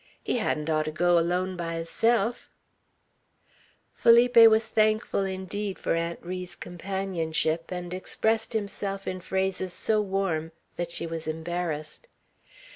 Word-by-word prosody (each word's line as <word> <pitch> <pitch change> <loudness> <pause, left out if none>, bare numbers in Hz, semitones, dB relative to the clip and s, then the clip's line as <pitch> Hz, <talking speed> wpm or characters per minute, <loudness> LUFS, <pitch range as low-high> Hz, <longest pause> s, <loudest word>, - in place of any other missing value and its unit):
He 245 - 0
hadn't 150 -8 -1
orter 155 -1 +1
go 175 +2 +3
alone 180 +2 0
by 165 -1 -3
hisself." 225 +7 0 1.4
Felipe 240 +1 +5
was 220 0 +3
thankful, 215 -2 +2
indeed, 190 +1 -4
for - - -1
Aunt 170 0 -1
Ri's 180 0 -5
companionship, 175 -3 -2
and 180 -1 -4
expressed 220 +5 -1
himself 200 -2 -3
in 185 0 -3
phrases 190 -1 -2
so 215 +3 +1
warm, 190 -5 -1 0.2
that 175 -1 -3
she 170 - -3
was 165 -1 -5
embarrassed. 160 - -4
185 Hz, 120 wpm, -27 LUFS, 165-205 Hz, 1.4 s, Felipe